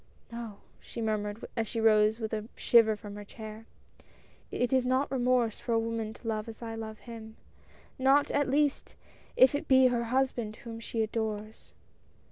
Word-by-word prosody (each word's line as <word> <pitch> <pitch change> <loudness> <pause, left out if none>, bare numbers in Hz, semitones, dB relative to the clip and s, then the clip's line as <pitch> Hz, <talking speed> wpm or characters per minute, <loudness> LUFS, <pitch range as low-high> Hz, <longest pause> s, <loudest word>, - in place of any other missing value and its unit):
" - - -32
No," 230 -3 -7 0.2
she - - -9
murmured 215 -1 -2
as 225 -2 -1
she 230 - -3
rose 215 0 +4
with 220 -1 -4
a 215 +1 -3
shiver 225 -2 +5
from 205 -1 -9
her 205 - -7
chair, 220 +1 -10 0.8
"it 245 +2 -1
is 260 -1 +4
not 260 +3 +1
remorse 250 -3 +1
for 235 - -2
a 225 - +4
woman 225 -1 -2
to 235 - -11
love 215 0 -2
as 225 +1 -10
I 225 -1 -5
love 220 -1 -7
him 225 -2 -10 0.3
— - - -28
not 285 +1 +4
at 285 -1 +1
least 290 +1 +1 0.4
if 260 +1 +7
it 290 +2 -2
be 260 -1 +6
her 240 -1 0
husband 240 -3 0
whom 230 -1 -7
she 230 0 -2
adores." 215 -1 -4
225 Hz, 185 wpm, -30 LUFS, 220-245 Hz, 0.8 s, if